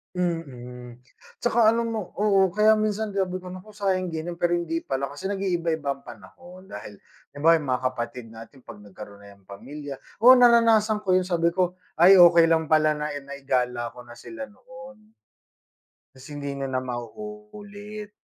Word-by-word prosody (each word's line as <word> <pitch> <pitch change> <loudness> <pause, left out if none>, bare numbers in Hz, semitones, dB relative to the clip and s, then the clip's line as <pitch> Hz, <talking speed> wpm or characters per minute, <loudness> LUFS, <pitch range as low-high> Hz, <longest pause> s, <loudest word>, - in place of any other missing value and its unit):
Mm, 125 -9 -5 0.4
tsaka 235 -2 +3
alam 230 0 -1
mo 215 -5 -5
oo, 195 -2 +3
kaya 215 +4 +4
minsan 215 -1 -2
sabi 185 -2 -1
ko 185 - -14
naku 185 +3 -10
sayang 190 -3 -1
din, 160 0 -5
pero 175 0 0
hindi 165 -1 -3
pala 135 0 -3
kasi 145 +8 -6
nag-iiba-iba 170 -6 -2
ang 135 - -20
panahon. 175 - -14
Dahil 105 - -10 0.3
'di 145 - -13
ba 165 +3 +5
yung 150 -5 -1
mga 125 - +1 0.2
kapatid 120 0 -6
natin 115 +4 -13
'pag 105 - -11
nagkaroon 100 0 -12
na 100 - -14
'yan 100 - -18
ng - - -20
pamilya 145 +6 -8 0.2
oo, 245 +4 +8
naranasan 230 -3 +4
ko 185 - +3
yun 185 - +3
sabi 170 -2 0
ko, 185 0 -1 0.2
"Ay 185 +4 +7
okey 170 -1 +7
lang 160 -1 +2
pala 155 0 +3
na, 150 0 -3
eh, 145 - -6
naigala 130 -4 -3
ko 125 - -11
na 120 0 -14
sila 275 - -9
noon." 255 -2 -15 1.0
Kasi 130 0 -14
hindi 145 -1 -5
niyo 135 - -3
na 130 0 -2
maulit, 210 - -8
170 Hz, 180 wpm, -24 LUFS, 135-210 Hz, 1.0 s, oo